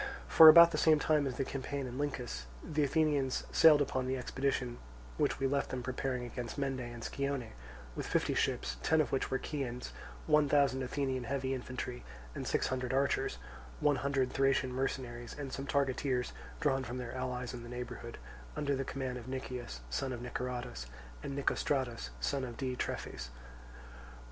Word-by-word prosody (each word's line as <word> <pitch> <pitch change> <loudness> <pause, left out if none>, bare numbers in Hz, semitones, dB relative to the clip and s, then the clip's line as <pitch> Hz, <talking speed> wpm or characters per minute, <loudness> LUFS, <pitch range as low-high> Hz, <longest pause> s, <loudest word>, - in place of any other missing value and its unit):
For 160 -1 +11
about 170 +1 +10
the - - -1
same 155 -1 +6
time 150 -1 +2
as 125 -2 -4
the 135 - 0
campaign 135 +1 -3
in 125 +1 -6
Lyncus, 65 - -3 0.2
the 150 -1 0
Athenians 145 -2 +1
sailed 150 -3 +7
upon 130 -2 -2
the 130 0 0
expedition 125 -1 -1 0.4
which - - +1
we 135 - 0
left 140 +1 +1
them 125 -1 -3
preparing 130 0 -2
against 120 +1 -5
Mende 135 -2 -1
and 120 -1 -6
Scione, 140 -4 -2 0.4
with - - -4
fifty - - +1
ships, - - 0
ten 160 - +3
of 155 - +2
which 135 - 0
were 130 - +1
Chians, 125 -4 -4 0.3
one 150 -2 +4
thousand 140 -2 +3
Athenian 130 -1 -1
heavy 135 +1 -1
infantry 125 - -5 0.3
and - - -5
six - - +1
hundred 130 0 -1
archers, 135 - +1 0.4
one 145 -1 +3
hundred 135 -2 0
Thracian 135 -1 +2
mercenaries 125 -2 -3
and 140 -3 -5
some 140 0 -4
targeteers 135 -2 0 0.3
drawn 135 -4 +1
from 125 0 -5
their 125 -2 -5
allies 125 -1 -3
in 120 - -6
the 120 - -9
neighbourhood, 120 -1 -6 0.4
under 140 -1 0
the 135 - -1
command 130 -2 -4
of 120 - -11
Nicias, 125 - -5
son 130 - -1
of 120 - -5
Niceratus, 125 - -4 0.3
and 140 - -5
Nicostratus, 130 - 0
son 135 - -1
of 120 -2 -6
Diitrephes. 130 - -3
130 Hz, 170 wpm, -33 LUFS, 125-140 Hz, 0.4 s, For